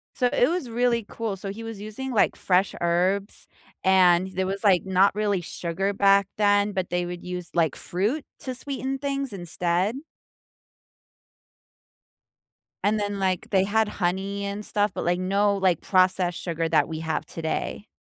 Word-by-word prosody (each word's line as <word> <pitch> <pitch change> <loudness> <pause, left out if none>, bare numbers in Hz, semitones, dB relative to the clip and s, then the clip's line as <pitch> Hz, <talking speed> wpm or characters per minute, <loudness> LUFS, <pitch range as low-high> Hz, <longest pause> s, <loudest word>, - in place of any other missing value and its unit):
So, 250 - +2
it 245 - +3
was 340 -7 -2
really 235 -1 +1
cool, 225 -3 -4
so, 195 +1 -6
he 225 +3 -8
was 225 -2 -7
using, 215 +6 -6
like, 220 - +2
fresh 185 +1 +1
herbs, 185 +4 0 0.4
and 185 -1 +5
there 185 0 -1
was, 195 +2 -3
like, 190 -4 +4
not 190 +1 +4
really 205 -2 0
sugar 175 +4 -2
back 200 -1 +4
then, 205 0 +3
but 185 -3 -2
they 175 0 0
would 175 0 -6
use, 180 -1 -5
like, 165 -4 +2
fruit 215 - -2
to 255 -1 -4
sweeten 270 0 -3
things 275 -1 -2
instead. 180 +3 -1 2.9
And 210 +1 +2
then, 205 -1 -2
like, 185 -2 -1
they 190 -2 +3
had 215 +2 +2
honey 195 +1 -2
and 200 +1 -4
stuff, 205 0 +1
but, - - -3
like, 175 +1 +1
no, 200 +2 +2
like, 185 -4 +2
processed 185 -2 +2
sugar 165 -2 -2
that 160 - +3
we 160 -1 -5
have 160 -1 -2
today. 165 +5 -4
195 Hz, 165 wpm, -25 LUFS, 180-210 Hz, 2.9 s, and